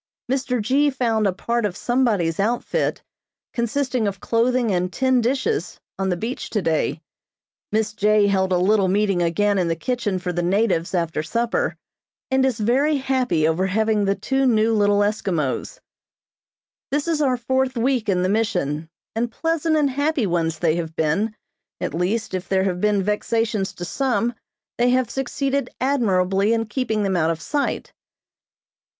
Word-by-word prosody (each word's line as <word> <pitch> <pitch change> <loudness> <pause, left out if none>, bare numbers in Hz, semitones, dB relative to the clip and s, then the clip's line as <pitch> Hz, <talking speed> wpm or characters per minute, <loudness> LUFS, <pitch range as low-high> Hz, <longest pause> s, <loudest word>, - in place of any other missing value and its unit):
Mr. 255 -2 0
G. 270 +7 +2
found 230 -5 +1
a - - +2
part 235 +5 -2
of 200 -4 -2
somebody's 215 -10 +1
outfit, 230 +5 0 0.5
consisting 245 -1 0
of 200 -1 -3
clothing 235 +1 +1
and 180 0 0
tin 260 +3 +2
dishes, 275 - -1 0.2
on 190 0 0
the 180 - 0
beach 230 +8 -4
today. 165 -5 -1 0.7
Miss 215 0 0
J. 210 0 +3
held 190 -1 +1
a 180 - +3
little 195 +2 +3
meeting 195 -1 +1
again 195 +4 +1
in 180 - +1
the 165 - 0
kitchen 210 +1 -2
for 180 -1 -3
the 175 - -1
natives 185 -1 +1
after 165 -3 -1
supper, 235 - -1 0.6
and 265 0 +3
is 260 -3 +1
very 270 +8 +2
happy 255 - +1
over 170 +4 +1
having 215 +1 +1
the 195 0 +1
two 270 +3 0
new 225 -1 +3
little 205 -1 +3
Eskimos. 190 -9 -1 1.1
This 290 +3 -1
is 320 -2 +1
our 260 -3 +2
fourth 260 +1 0
week 240 -2 +1
in 180 -2 +2
the - - +2
Mission, 165 -8 -1 0.3
and 235 +1 -1
pleasant 325 +2 0
and 290 -3 +2
happy 285 -1 0
ones 165 -3 0
they 165 -1 +1
have 165 -2 -4
been, 185 +9 0 0.4
at - - -3
least, 195 +7 -1
if 185 0 -4
there 190 -1 +2
have 180 -2 -1
been 210 -2 +2
vexations 210 0 0
to 175 - -6
some, 240 +1 0 0.5
they 245 +1 +4
have 250 -2 +1
succeeded 270 0 -1
admirably 200 -6 +2
in 225 0 0
keeping 220 -2 -1
them 195 -1 0
out 160 -2 +2
of 165 -1 -1
sight. 285 - -2
215 Hz, 165 wpm, -22 LUFS, 185-255 Hz, 1.1 s, they